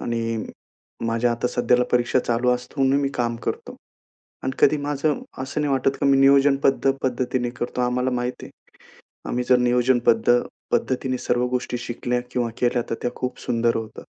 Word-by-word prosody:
आणि 115 -1 -2 0.6
माझ्या 115 +1 +1
आता 120 +1 -2
सध्याला 125 0 +2
परीक्षा 120 +1 +2
चालू 120 0 0
असता, 125 +3 -3
म्हणून 135 +1 +3
मी 140 - 0
काम 120 -1 -1
करतो. - - -4 0.7
आणि 130 - -2
कधी 155 - +5
माझं 145 +1 -1 0.2
असं 130 +3 -3
नाही 145 -2 0
वाटत, 135 0 +2
की - - +2
मी 135 0 +5
नियोजनबद्ध 135 0 +4
पद्धतीने 125 -1 -1
करतो. 120 +1 -4
आम्हाला 125 +1 0
माहिती 125 0 -3
आहे, - - -23 0.5
आम्ही 125 +1 -1
जर 125 - +6
नियोजनबद्ध 120 -1 +3 0.3
पद्धतीने 130 0 0
सर्व 125 0 0
गोष्टी 125 0 -2
शिकल्या 125 0 -2
किंवा 120 -2 -1
केल्या, 120 0 +1
तर 115 - -1
त्या 120 - -1
खूप 125 - -4
सुंदर 115 0 +1
होतात. 110 -1 -7
125 Hz, 165 wpm, -23 LUFS, 120-130 Hz, 0.7 s, जर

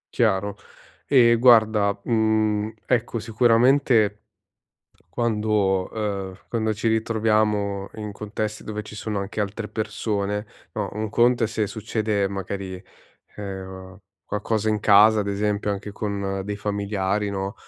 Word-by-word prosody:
Chiaro, 100 -3 +1 0.5
e 120 -4 +5
guarda, 110 -4 +4
mhmm, 110 -2 +1
ecco 120 -1 0
sicuramente 115 -1 +3 0.9
quando, 105 -5 0
ehm, 100 -4 -3
quando 110 -2 -1
ci 110 +2 -1
ritroviamo 105 -3 +1
in 105 -1 -6
contesti 105 +1 -5
dove 105 0 -4
ci 105 0 -11
sono 105 -1 -3
anche 100 +2 -4
altre 105 +2 -3
persone, 105 -1 -2 0.3
no, 105 -3 -3
un 110 +1 -2
conto 120 +1 +3
è - - +2
se 110 -2 -2
succede 110 -2 -1
magari, 95 -1 -5 0.5
ehm, 95 -1 -8 0.2
qualcosa 110 +1 -1
in 105 -1 +1
casa 105 +1 +6
ad 100 - -3
esempio 105 +1 -1
anche 100 0 -4
con 100 -2 -3
dei 105 +1 -4
familiari 100 0 -1
no, 95 +1 -3
105 Hz, 125 wpm, -24 LUFS, 100-110 Hz, 0.9 s, casa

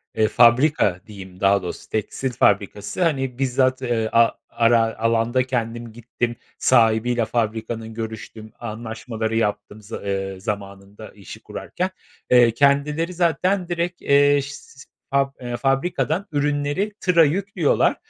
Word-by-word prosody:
eee, 110 -1 +3
fabrika 120 - +3
diyeyim, 95 -3 -11
daha 100 0 +3
doğrusu, 90 - -7
tekstil 110 +5 -2
fabrikası, 105 - 0
hani 135 -6 -1
bizzat, 130 0 +1
eee, 115 -3 -1
a 115 0 +5 0.2
ara 115 -1 +2
alanda 115 +2 +1
kendim 120 -2 -3
gittim, 120 +1 -4 0.2
sahibiyle 115 +1 +3
fabrikanın 110 0 -3
görüştüm, 110 -1 -7
anlaşmaları 110 0 -5
yaptım 105 -1 -2
zı 105 +2 -8
eee, 95 -1 -3
zamanında 100 +1 -7
işi 100 -3 -12
kurarken. 185 +1 -4 0.4
Eee, 120 -2 +6
kendileri 145 +6 +1
zaten 180 +2 +1
direkt, 175 0 -3
eee, 145 0 +4
şis 135 -1 -11 0.3
fab 140 0 +2
eee, 120 -1 -4
fabrikadan 150 +7 0
ürünleri 145 +7 -1
tıra 175 -3 +4
yüklüyorlar. 195 +7 +1
120 Hz, 125 wpm, -22 LUFS, 110-140 Hz, 0.4 s, Eee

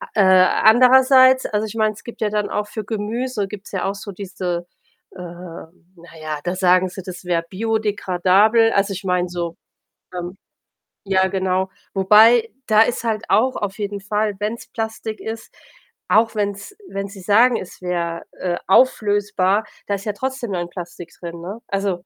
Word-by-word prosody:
Äh, 210 - +4
andererseits, 255 +7 +6
also, 210 0 -1
ich 215 - -9
meine, 215 -1 +1
es - - -16
gibt 235 - -10
ja 215 - +1
dann 210 0 -1
auch 210 0 -2
für 215 0 -6
Gemüse 220 +1 -3
gibt's 205 -1 -10
ja 190 - -2
auch 195 +1 -2
so 205 0 -8
diese 180 -2 -4 0.5
äh, 190 - -14
na 170 0 -12
ja, 155 -1 -4
da 180 +1 -1
sagen 185 0 +3
sie, 185 +2 -8
das 185 -1 -9
wäre 170 -1 0
biodégradable. 210 +1 +2
Also, 195 0 +1
ich 190 +2 -7
meine 180 -1 0
so, 170 -1 -5 0.6
ähm 180 +2 -6 0.7
ja, 190 -1 +3
genau. 190 0 -1 0.2
Wobei, 220 +4 +5 0.2
da 215 -1 +4
ist 240 +1 -1
halt 220 -2 -1
auch 235 +7 +2
auf 205 0 -4
jeden 205 -1 -4
Fall, 210 +1 -1
wenn's 215 +3 -4
Plastik 220 -1 -5
ist 225 0 -7 0.5
auch 225 +1 +3
wenn's 205 - -3
wenn 195 0 -4
sie 195 -1 -12
sagen, 225 +6 +4
es 185 - -10
wäre, 170 -2 -2 0.2
äh, 175 -1 -2
auflösbar, 205 -3 +2 0.2
da 200 - -1
ist 200 +2 -6
ja 210 - 0
trotzdem 260 -2 -4
dann 175 -1 -3
Plastik 175 -1 -8
drin, 170 -1 -7
ne? 195 +6 -6
Also 195 0 -1
200 Hz, 170 wpm, -20 LUFS, 185-220 Hz, 0.7 s, andererseits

